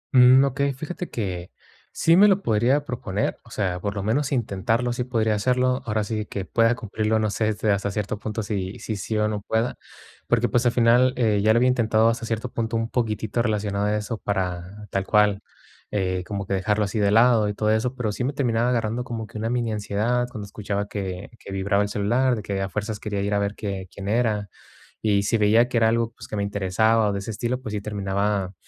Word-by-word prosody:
Mm, 130 +2 +8
okey, 140 +1 0
fíjate 165 +6 -6
que 90 -5 -4 0.4
sí 165 +1 +3
me 205 +2 +8
lo 195 0 +3
podría 120 +7 +2
proponer, 105 -5 -2
o 120 - -18
sea, 95 -5 -2
por 100 0 -3
lo 100 - -3
menos 135 +7 0
intentarlo, 115 +1 0
sí 125 - -2
podría 110 -3 +1
hacerlo, 125 +4 +1
ahora 105 -1 0
sí 105 0 -3
que 95 -2 -5
pueda 115 +3 +2
cumplirlo, 110 0 -1
no 110 -1 0
sé 110 0 0 0.2
hasta 100 0 0
cierto 105 +1 -3
punto 110 0 -4
si 100 -2 -3
si 110 - -4
sí 110 +2 -3
o 105 0 +2
no 105 -1 -3
pueda, 110 +3 -1 0.5
porque, 120 0 +2
pues, 120 -1 +2
al - - +4
final, 125 +2 +4
eh, 105 -4 +2
ya 110 +1 +4
lo 115 - +4
había 125 +1 +4
intentado 115 -2 +3
hasta 115 0 -2
cierto 115 +2 -2
punto 115 0 -2
un 115 0 -2
poquitito 110 -1 -1
relacionado 105 -3 -1
a 105 0 +1
eso 105 +1 -4
para 95 +1 -3
tal 95 -1 -1
cual, 105 -2 +3 0.5
eh, 95 -3 -1
como 100 -2 -4
que - - -3
dejarlo 105 +2 +1
así 105 +2 -3
de 100 -1 +3
lado 110 -1 +4
y 105 - -4
todo 110 0 +1
eso, 120 +4 0
pero 115 -5 -2
sí 120 - -3
me 135 +3 -1
terminaba 120 -3 +1
agarrando 115 0 0
como 115 -3 -5
que 105 - -9
una 115 +1 -1
mini 120 -2 0
ansiedad 110 +4 0
cuando 105 -4 -7
escuchaba 100 0 -3
que 95 -1 -5
que 100 - -10
vibraba 100 +1 +1
el 100 - -1
celular, 120 +5 +1
de 105 - -6
que 100 -1 -2
a 95 - -2
fuerzas 105 +1 -3
quería 100 -2 -3
ir 100 +1 -1
a 100 - +2
ver 100 +1 -1
que 95 -3 -5
quién 100 0 -8
era. 105 -3 0 0.5
Y 100 -2 +2
si 115 +3 +1
veía 110 +3 +4
que 120 - 0
era 110 -1 +4
algo, 115 0 0
pues, - - -12
que 105 - -5
me 100 - -1
interesaba 105 +2 +2
o - - -1
de - - -2
ese 100 - -5
estilo, 120 +4 -2
pues 110 -4 -6
sí 105 - -2
terminaba, 100 -1 -1
110 Hz, 230 wpm, -24 LUFS, 100-120 Hz, 0.5 s, Mm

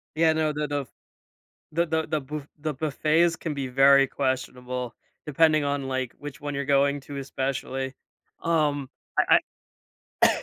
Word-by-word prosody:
Yeah, 160 0 +4
no, 155 -1 +1
the 150 0 -1
the 145 0 -1
f 135 - -10 0.9
the 170 +2 +2
the 160 -1 -1
the 155 - -1
buf 145 +1 -6
the 155 0 -3
buffets 155 +3 +2
can 160 -1 -4
be 140 -2 -3
very 135 +2 +6
questionable 125 -2 -3 0.3
depending 155 0 +3
on, 140 -1 -1
like, 130 -2 -2
which 145 -1 -8
one 145 -1 -4
you're 140 0 -2
going 140 +1 +3
to 140 0 -8
especially. 135 -1 -3 0.5
Um, 150 -5 +1 0.3
I - - +6 0.9
I - - 0
145 Hz, 155 wpm, -26 LUFS, 135-155 Hz, 0.9 s, very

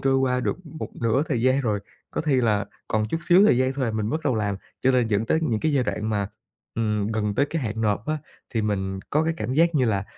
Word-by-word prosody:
trôi 135 0 +2
qua 125 -1 +1
được - - -1
một 155 +1 -6
nửa 115 +4 +2
thời 120 -5 0
gian 130 +2 +3
rồi, 105 -5 0 0.3
có - - -2
khi 150 -4 +1
là 110 -4 +2 0.2
còn 110 0 +1
chút 165 - -1
xíu 180 +3 +7
thời 125 - +4
gian 130 +1 +2
thôi 135 -1 -1
à, 115 - 0
mình 110 -1 -2
mới - - -2
bất 160 - -9
đầu 130 -4 +2
làm. 100 -2 -1 0.2
Cho 130 - +3
nên 125 -2 +3
dẫn 110 +1 0
tới 160 - +2
những 115 -8 0
cái 155 -1 +1
giai 130 -3 +2
đoạn 105 +1 -2
mà, 100 -2 0 0.5
ừm, 105 -2 0
gần 105 -2 -1
tới 140 - +2
cái 160 -2 -3
hạn 110 -1 -3
nộp 105 +2 0
á, 155 0 0 0.4
thì 110 - +1
mình 95 -2 -1
có 155 +2 +2
cái 165 0 0
cảm 130 - -3
giác 165 +3 +3
như 130 -4 +3
là, 100 -3 0
120 Hz, 275 wpm, -24 LUFS, 105-140 Hz, 0.5 s, xíu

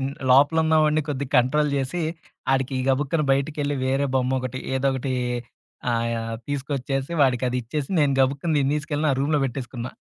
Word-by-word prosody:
In 135 +1 -1 0.2
లోపలున్నవాడిని 155 +2 +4
కొద్దిగా 140 -2 -3
control 145 +4 +2
చేసి 140 +6 -2 0.5
ఆడికి 135 0 0
గబుక్కన 145 +4 +1
బయటికెళ్ళి 145 +1 -1
వేరే 135 +2 +1
బొమ్మొకటి 130 -1 0 0.2
ఏదోకటి 130 0 0 0.8
ఆహ్, 115 0 0
యాహ్! 115 0 -3
తీసుకొచ్చేసి, 135 +1 -2
వాడికదిచ్చేసి 125 +2 0
నేను 145 -2 +3
గబుక్కుంది 140 +4 +1
నేను 135 +2 +1
తీసుకెళ్ళి 150 0 -2
నా - - +3
రూమ్‌లో 150 +2 +2
పెట్టేసుకున్నా. 125 -1 -5
135 Hz, 130 wpm, -24 LUFS, 130-145 Hz, 0.8 s, లోపలున్నవాడిని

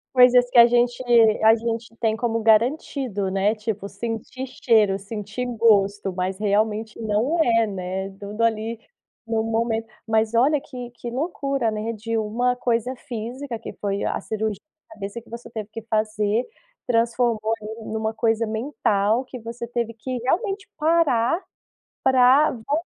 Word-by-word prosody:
Coisas 250 -1 +7
que 245 - +6
a 235 - +10
gente 240 +1 +2 0.4
a 220 +1 +7
gente 230 0 -4
tem 220 -2 +1
como 230 0 -1
garantido, 225 - +1
né, 195 +3 +1
tipo 210 -2 -4
sentir 225 +5 -5
cheiro, 215 -6 +2
sentir 210 +3 -5
gosto, 205 -3 +3
mas 185 +1 -2
realmente 215 +2 0
não 225 +10 0
é, 230 -3 +3
né, 190 -1 -4
tudo 210 +3 -4
ali, 225 0 0 0.5
no 225 -1 0
momento. 225 0 -1 0.2
Mas 220 0 +1
olha, 275 +5 +3
que 250 -3 -8
que 240 0 -7
loucura, 275 -3 -1
né, 215 +2 -3
de 225 +1 -4
uma 230 +3 0
coisa 245 0 -1
física, 240 +2 -6
que 225 - -8
foi 200 -1 -3
a - - -1
cirurgia 220 0 -2
de 315 0 -68
cabeça 205 +1 -6
que 235 - -20
você 235 +1 -8
teve 220 -3 -6
que 225 - -5
fazer, 215 0 0 0.4
transformou 230 -2 +1
em 220 +1 -7
uma 220 0 -1
coisa 225 0 +1
mental, 220 -1 0
que 255 0 -9
você 230 +1 -6
teve 235 -1 -3
que, 250 +3 -4
realmente, 390 - -1
parar 320 -1 +2 0.6
para 260 +3 +5
voltar 260 +4 -2
230 Hz, 150 wpm, -23 LUFS, 215-245 Hz, 0.6 s, a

